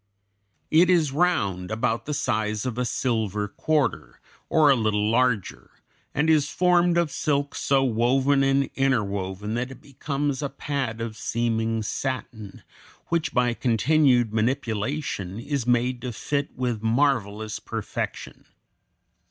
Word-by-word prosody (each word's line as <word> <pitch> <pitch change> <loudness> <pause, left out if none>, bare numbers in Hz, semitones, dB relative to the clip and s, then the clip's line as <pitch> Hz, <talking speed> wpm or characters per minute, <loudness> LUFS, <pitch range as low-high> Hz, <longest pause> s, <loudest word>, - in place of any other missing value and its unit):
It 170 +3 +5
is 165 -6 +3
round, 100 - 0
about 115 +2 -1
the 150 - -2
size 110 -2 -1
of 125 -1 -3
a 125 - 0
silver 110 -4 -1
quarter, 145 +4 -1 0.3
or 150 -3 +5
a - - +5
little 105 -2 +1
larger, 115 -6 0 0.4
and 150 +2 0
is 155 -2 +3
formed 175 0 +3
of 170 -3 +1
silk 145 -1 -1
so 135 -1 +1
woven 130 +3 +2
and 135 0 +2
interwoven 105 -6 -1
that 120 +2 -2
it 135 - -11
becomes 140 0 -3
a 140 - -2
pad 130 -7 -3
of 115 -1 -4
seeming 115 0 -1
satin, 110 -4 -5 0.5
which 165 -1 0
by 125 -1 +2
continued 125 -1 +2
manipulation 110 -3 -2
is 135 0 -3
made 125 +1 +1
to 125 - -4
fit 140 +5 -2
with 120 -4 -2
marvelous 110 -3 0
perfection. - - -5
125 Hz, 130 wpm, -25 LUFS, 110-140 Hz, 0.5 s, It